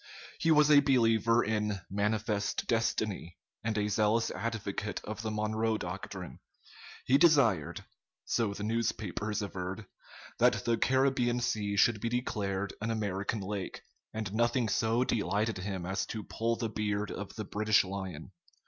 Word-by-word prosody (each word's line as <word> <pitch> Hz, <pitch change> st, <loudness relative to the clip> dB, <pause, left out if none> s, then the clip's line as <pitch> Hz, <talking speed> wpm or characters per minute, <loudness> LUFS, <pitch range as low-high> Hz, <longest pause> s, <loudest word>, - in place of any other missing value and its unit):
He 165 Hz, -, +1 dB
was 150 Hz, -1 st, +6 dB
a 145 Hz, -, +9 dB
believer 115 Hz, -4 st, +3 dB
in 105 Hz, -2 st, -1 dB
"manifest 105 Hz, 0 st, -1 dB
destiny" 110 Hz, -6 st, -1 dB, 0.3 s
and 110 Hz, -1 st, -1 dB
a 105 Hz, 0 st, +1 dB
zealous 110 Hz, +2 st, +2 dB
advocate 105 Hz, -2 st, -3 dB
of 105 Hz, 0 st, -5 dB
the 110 Hz, -, -3 dB
Monroe 110 Hz, +1 st, 0 dB
doctrine. 90 Hz, -1 st, -6 dB, 0.7 s
He 135 Hz, +2 st, +4 dB
desired 130 Hz, -, +3 dB, 0.4 s
so 115 Hz, -4 st, +1 dB
the 105 Hz, -, -5 dB
newspapers 105 Hz, -2 st, -1 dB
averred 95 Hz, +1 st, -5 dB, 0.5 s
that -, -, +3 dB
the 115 Hz, -1 st, +2 dB
Caribbean 130 Hz, -2 st, +2 dB
Sea 105 Hz, -4 st, -1 dB
should 105 Hz, 0 st, +4 dB
be 115 Hz, -, -1 dB
declared 100 Hz, -5 st, -2 dB
an 115 Hz, -, -2 dB
American 105 Hz, -1 st, -2 dB
lake, 100 Hz, 0 st, -5 dB, 0.3 s
and 110 Hz, -2 st, -4 dB
nothing 120 Hz, +1 st, +2 dB
so 115 Hz, +4 st, +2 dB
delighted 110 Hz, -3 st, 0 dB
him 95 Hz, -2 st, -4 dB
as 95 Hz, +1 st, -2 dB
to 110 Hz, -1 st, -5 dB
pull 115 Hz, +1 st, -1 dB
the 115 Hz, 0 st, -2 dB
beard 105 Hz, -1 st, -2 dB
of 105 Hz, -, -6 dB
the 110 Hz, -, -4 dB
British 105 Hz, +1 st, +3 dB
lion. 95 Hz, -3 st, -6 dB
110 Hz, 145 wpm, -31 LUFS, 100-115 Hz, 0.7 s, a